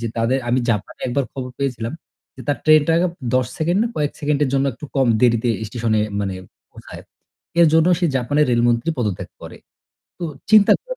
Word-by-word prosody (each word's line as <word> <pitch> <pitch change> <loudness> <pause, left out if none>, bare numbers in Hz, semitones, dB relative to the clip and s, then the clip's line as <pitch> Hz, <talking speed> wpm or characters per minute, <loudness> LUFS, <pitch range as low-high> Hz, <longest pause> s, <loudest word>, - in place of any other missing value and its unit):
যে 115 - -3
তাদের 115 +4 +1
আমি 125 +2 +2
জাপানে 105 -2 -3
একবার 135 +2 0
খবর 125 -1 -6
পেয়েছিলাম 125 -4 -3 0.4
যে - - -11
তার 145 - +1
ট্রেনটা 155 0 +5 0.4
১০ 130 -1 +2
সেকেন্ড 170 +4 +1
না 235 - 0
কয়েক 150 -1 0
সেকেন্ডের 145 -1 +1
জন্য 135 0 +2
একটু 125 - -11
কম 135 - +3
দেরিতে 120 -1 +3 0.2
স্টেশনে 115 -1 -1 0.2
মানে 95 -2 -2 0.4
পৌঁছায়। - - -12 0.6
এর 170 - +7
জন্য 160 0 +4
সে 175 - +2
জাপানের 145 +4 +1
রেলমন্ত্রী 120 +4 +2
পদত্যাগ 105 -6 -2
করে। - - -10 0.6
তো - - -7 0.3
চিন্তা 215 -2 +7
করে - - -6
130 Hz, 175 wpm, -20 LUFS, 120-150 Hz, 0.6 s, এর